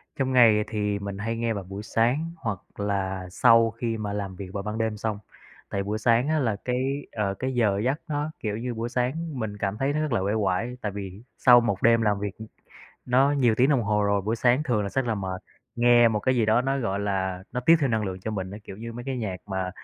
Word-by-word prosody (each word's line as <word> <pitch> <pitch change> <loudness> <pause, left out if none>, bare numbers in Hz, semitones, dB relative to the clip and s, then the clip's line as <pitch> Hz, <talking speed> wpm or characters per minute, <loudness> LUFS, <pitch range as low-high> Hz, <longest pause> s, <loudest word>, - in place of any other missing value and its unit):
Trong 130 -1 -1
ngày 110 -4 +6
thì 105 -2 -1
mình 100 -1 -5
hay 115 +3 -3
nghe 115 -1 0
vào 100 - -4
buổi 100 +3 -7
sáng 125 +10 0
hoặc 110 - -3 0.2
là 95 -2 -2
sau 115 +2 +5
khi 115 0 -3
mà 105 -2 -4
làm 100 -2 -4
việc 95 +1 -7
vào 100 - -3
ban 105 +1 -4
đêm 110 -1 -1
xong. 105 -1 -3 0.5
Tại 100 - -2
buổi 105 +2 -2
sáng 115 +4 +2
á, 155 0 +1
là 115 -7 0
cái, 130 +3 -1
ờ, 105 -3 -1
cái 130 +6 -3
giờ 105 -5 +2
giấc 135 +5 0
nó, 150 0 -2
kiểu 105 -2 -3
như, 120 +2 -3
buổi 115 +1 -3
sáng 135 +4 -2
mình 105 -3 -4
cảm 100 0 -2
thấy 135 +4 0
nó 150 - 0
rất 155 -2 -2
là 115 - +1
uể 100 +2 0
oải, 110 +4 -1
tại 105 - -2
vì 100 +1 -7
sau 120 -1 +7
một 115 -5 -1
đêm 115 0 +5
làm 105 -2 +1
việc, 100 0 -4
ừm, 110 - -9 0.6
nó 130 +3 +4
nhiều 125 -6 +3
tiếng 125 +4 +3
đồng 135 -5 +3
hồ 105 0 +1
rồi, 100 0 +2
buổi 110 +4 -1
sáng 125 +4 +3
thường 120 -8 0
là 100 - -2
sẽ 135 +7 0
là 120 -3 -1
mệt, 95 -2 -4 0.3
nghe 120 0 +6
một 110 -2 -1
cái 130 +3 +1
gì 115 -3 +2
đó 110 +2 +4
nó, 135 +1 0
gọi 100 -6 -1
là, 95 -2 -2
nó 125 - -2
tiếp 165 +7 +6
thêm 140 -3 +1
năng 110 -2 0
lượng 95 -1 -5
cho 110 - -4
mình 95 -3 -4
á, 100 - -7
kiểu 95 - -9
như 115 +2 -7
mấy 120 +1 -7
cái 135 -1 -3
nhạc 105 -6 -3
mà, 95 -2 -2
110 Hz, 260 wpm, -26 LUFS, 100-125 Hz, 0.6 s, sau